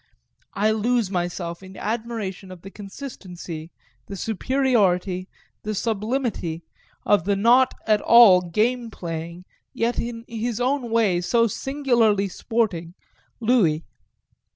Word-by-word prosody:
I 210 +2 +2
lose 220 -1 0
myself 175 -1 -3
in 190 0 -12
admiration 220 -4 -4
of 185 -2 -11
the 195 - -10
consistency, 185 - -8 0.4
the 200 - -6
superiority, 200 -5 0 0.3
the 215 0 -4
sublimity, 215 -6 -2 0.4
of 205 -5 +3
the 200 0 +2
not 245 +6 +4
at 215 -2 +3
all 225 -6 +7
game 225 +7 0
playing, 170 -2 -6 0.3
yet 235 +1 -1
in 230 -1 -5
his 230 0 -3
own 255 0 0
way 215 -6 +2
so 230 +6 +2
singularly 235 -5 +1
sporting, 185 -6 -2 0.4
Louis. 210 -10 +2
210 Hz, 115 wpm, -23 LUFS, 180-235 Hz, 0.4 s, all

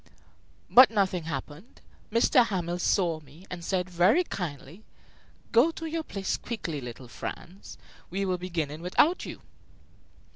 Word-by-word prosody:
But 255 +1 +8
nothing 190 -6 0
happened, 160 +4 -7 0.3
M. 235 +2 +4
Hamel 175 -3 -2
saw 175 -3 +1
me 155 +5 -17
and 175 -1 -6
said 180 0 -1
very 185 - +4
kindly: 170 - -6 0.7
"Go 240 +8 +5
to 325 - -6
your 325 +1 -2
place 195 -10 -3
quickly, 170 - -5
little 125 +1 -8
Franz. 180 +9 -8 0.3
We 195 +3 -2
were 185 -1 -1
beginning 165 -4 -3
without 290 - +2
you." - - -8
180 Hz, 135 wpm, -28 LUFS, 165-215 Hz, 0.7 s, But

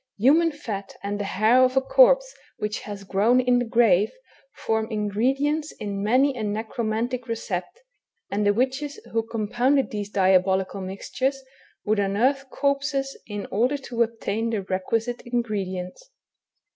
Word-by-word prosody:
Human 310 +10 +4
fat 210 -9 -6
and 205 +1 -3
the - - -1
hair 215 +6 +3
of 255 +1 +2
a - - +5
corpse - - +4 0.2
which 210 0 -3
has 205 -1 -8
grown 205 +6 +3
in 250 -1 +3
the 245 - -1
grave, 225 -4 +3 0.5
form 220 0 +1
ingredients 265 +9 0
in 200 -2 -5
many 255 +6 +3
a 235 - -5
necromantic 225 +3 -2
receipt, 215 -6 -3 0.7
and 205 +1 0
the 205 - +4
witches 265 +6 -1 0.2
who 225 - +1
compounded 240 +5 0
these 205 -1 -4
diabolical 190 0 +2
mixtures, 260 +8 -3 0.4
would 210 0 +1
unearth 250 +8 +1
corpses 280 -1 -1
in 205 -1 -5
order 245 +8 +1
to 240 -4 -4
obtain 225 -1 -1
the 215 -4 -2
requisite 225 +6 -2
ingredients. 210 - -3
225 Hz, 140 wpm, -24 LUFS, 205-265 Hz, 0.7 s, a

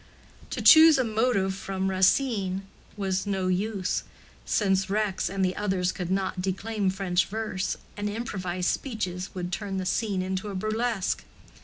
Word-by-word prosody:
To - - -4
choose 315 -1 +9
a 260 - +2
motive 220 -4 +1
from 190 0 -3
Racine 190 0 +2 0.3
was 190 -2 0
of - - -6
no 190 -2 -1
use, 195 +1 -1 0.4
since 195 -2 +1
Rex 205 -1 0
and 195 -1 0
the 185 - -1
others 190 -3 0
could 180 -2 -5
not 190 -1 -1
declaim 200 +2 -1
French 185 -2 0
verse, 210 -3 -2 0.2
and 205 +1 -2
improvised 185 -5 -2
speeches 185 -8 -3
would 180 -1 -4
turn 195 +1 -3
the 185 - -2
scene 195 -1 0
into 190 +2 -3
burlesque. 215 +1 -1
195 Hz, 150 wpm, -27 LUFS, 185-215 Hz, 0.4 s, choose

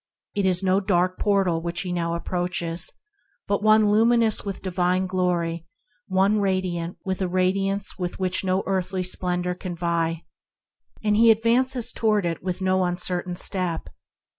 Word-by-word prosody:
It 200 -2 +1
is 185 0 +1
no 190 +1 +3
dark 185 -2 0
portal 195 -5 +1
that 170 +1 -4
he 185 -4 -2
now 170 -1 -1
approaches, 170 -1 -1 0.6
but 200 0 0
one 215 0 +5
luminous 225 0 +3
with 200 -2 -6
divine 180 0 0
glory, 175 -3 -1 0.4
one 195 +3 +2
radiant 185 -3 -1
with 190 0 -2
a 185 - +1
radiance 195 +3 0
with 175 -1 -3
which 185 0 0
no 185 +1 0
earthly 190 -1 -1
splendor 180 0 -1
can 180 0 -6
vie; 170 -1 -1 0.8
and 210 -1 +2
he 230 +2 +6
advances 240 +2 +2
toward 210 -4 +1
it 165 -2 -2
with 185 0 -4
no 185 0 +2
uncertain 180 0 -1
step. 175 - -1
185 Hz, 150 wpm, -24 LUFS, 175-200 Hz, 0.8 s, he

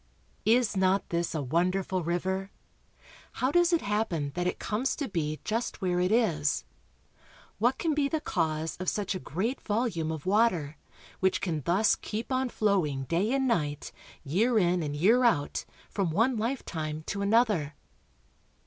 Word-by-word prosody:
Is 230 -1 +3
not 190 0 +2
this 170 -1 -1
a 150 - -1
wonderful 180 +6 0
river? 190 +3 -1 0.8
How 255 +2 0
does 350 +2 +4
it 335 - +3
happen 200 -9 -1
that 180 0 -1
it - - -1
comes 230 +6 -1
to 285 - -3
be 155 -7 -2
just 230 +2 -2
where 180 -3 0
it 180 +2 +1
is? 170 -11 +2 1.0
What 245 +5 +2
can 325 -2 0
be 290 -1 +1
the 315 - 0
cause - - -8
VALLEY 165 -5 +2
OF - - -4
THE 155 - -3
AMAZON. 160 - -4
3OI - - -11
of 185 - +1
such 205 -2 -2
a 185 - -4
great 205 - -3
volume 205 -8 -1
of 160 -3 -6
water, 185 -8 +2 0.4
which 190 0 +2
can 160 -5 -2
thus 195 +5 +3
keep 225 +4 -5
on 260 0 +1
flowing 180 - +1
day 170 - 0
and 270 0 +1
night, 150 - -1 0.3
year 215 - +2
in 180 -3 +3
and 145 -2 -3
year 220 +11 +4
out, 145 -12 +1 0.3
from 195 -4 0
one 230 +10 +2
life 235 +4 -2
time 155 -2 -4
to 200 +5 -4
another? 200 -9 +2
190 Hz, 180 wpm, -29 LUFS, 160-230 Hz, 1.0 s, does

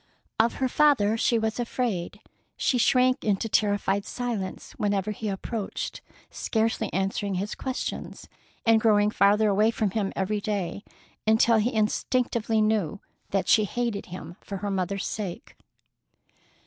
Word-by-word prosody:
Of 230 +1 +3
her 260 - 0
father 250 -7 +3
she 230 +1 +2
was 220 +1 -1
afraid. 220 -5 -2 0.4
She 250 - +1
shrank 255 +1 +3
into 205 +1 0
terrified 205 -2 +1
silence 225 -6 -4
whenever 205 0 0
he 210 +1 -4
approached, 200 +2 -4 0.3
scarcely 220 -1 -1
answering 195 +1 -1
his 200 +3 -2
questions, 260 -1 -5 0.4
and 225 -1 +5
growing 210 -2 +4
farther 210 +1 +4
away 210 +2 +3
from 215 -3 0
him 200 -1 -1
every 205 +2 -1
day, 200 -2 -3 0.4
until 220 +1 +5
he 220 +3 +1
instinctively 225 0 +1
knew 210 -4 0 0.3
that 195 -1 0
she 215 - +5
hated 235 0 -2
him 175 -1 -9
for 200 - -6
her 205 +1 -3
mother's 195 +1 -2
sake. 200 -5 -5
210 Hz, 135 wpm, -26 LUFS, 200-225 Hz, 0.4 s, and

